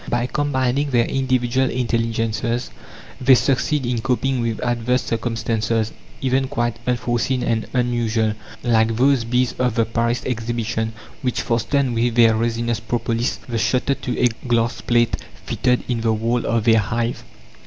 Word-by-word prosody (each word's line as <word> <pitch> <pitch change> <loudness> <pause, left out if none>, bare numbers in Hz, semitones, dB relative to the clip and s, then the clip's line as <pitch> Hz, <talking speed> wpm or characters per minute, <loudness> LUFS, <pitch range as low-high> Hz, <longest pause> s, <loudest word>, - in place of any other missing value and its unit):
By 120 0 +1
combining 140 0 0
their 120 -3 +3
individual 130 -1 +1
intelligences 115 - -1 0.5
they 130 +1 +7
succeed 140 +2 +1
in 120 -2 -1
coping 130 +1 0
with 115 -2 -2
adverse 120 +1 0
circumstances, 115 -1 -1 0.3
even 130 0 +1
quite 120 -2 -2
unforeseen 125 +1 0
and 115 -2 0
unusual, 120 -3 +1 0.3
like 115 -2 +2
those 130 +1 +3
bees 125 +2 +1
of 125 -3 +1
the 115 - +3
Paris 115 +2 -1
Exhibition 115 -2 -2 0.3
which 125 -3 -1
fastened 120 +3 0
with 115 0 0
their 115 -2 +6
resinous 115 +1 -1
propolis 115 +1 -1
the 115 -2 -2
shutter 130 +4 +1
to 125 -2 -4
a 125 - +4 0.2
glass 120 0 +1
plate 120 -1 +2 0.3
fitted 125 0 +1
in 120 -2 -1
the 115 -1 +2
wall 115 +2 0
of 115 -2 +1
their 115 -1 +5
hive. 120 +3 -2
120 Hz, 145 wpm, -21 LUFS, 115-125 Hz, 0.5 s, they